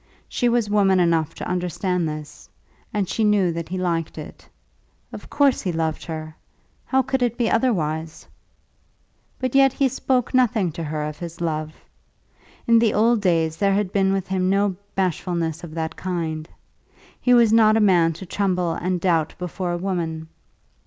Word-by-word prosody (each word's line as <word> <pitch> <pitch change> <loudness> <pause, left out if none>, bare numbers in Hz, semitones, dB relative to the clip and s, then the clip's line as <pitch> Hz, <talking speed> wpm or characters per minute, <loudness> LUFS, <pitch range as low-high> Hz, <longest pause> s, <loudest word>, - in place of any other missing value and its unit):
She 245 - 0
was 235 -2 +1
woman 200 -2 +3
enough 165 -2 +1
to - - -6
understand 180 -1 -1
this, 150 -1 -9 0.4
and 205 -3 -1
she 225 - -1
knew 205 -4 +3
that 165 -1 -5
he 185 - -3
liked 170 -3 -2
it. - - -10 0.6
Of - - -9
course 280 -3 +2
he 185 - -2
loved 160 -1 -2
her. 155 -1 -6 0.5
How 265 0 +2
could 265 0 -1
it 240 -1 0
be 235 -3 +1
otherwise? 160 -10 -1 1.1
But 255 -1 -3
yet 270 -1 +5
he 275 - +2
spoke 260 -1 -1
nothing 230 -8 +2
to 165 - -6
her 155 -1 -3
of 150 0 -5
his 170 -1 -7
love. 155 -2 -2 0.9
In 230 -1 +5
the 225 -2 +2
old 225 +1 +3
days 165 -4 +1
there 195 +1 +2
had 200 -2 -1
been 195 -1 +2
with 195 -1 -1
him 185 -1 0
no 200 0 +1 0.2
bashfulness 170 -3 -1
of 165 -2 -9
that 160 0 -3
kind. 165 -4 -4 0.7
He 250 -1 +4
was 230 -2 +5
not 220 -1 +5
a - - +3
man 175 -6 +4
to 190 - -9
tremble 180 -2 0
and 180 +2 -2
doubt 165 -3 +1
before 180 0 -4
a 175 - -1
woman. 165 -4 -3
180 Hz, 175 wpm, -22 LUFS, 165-210 Hz, 1.1 s, yet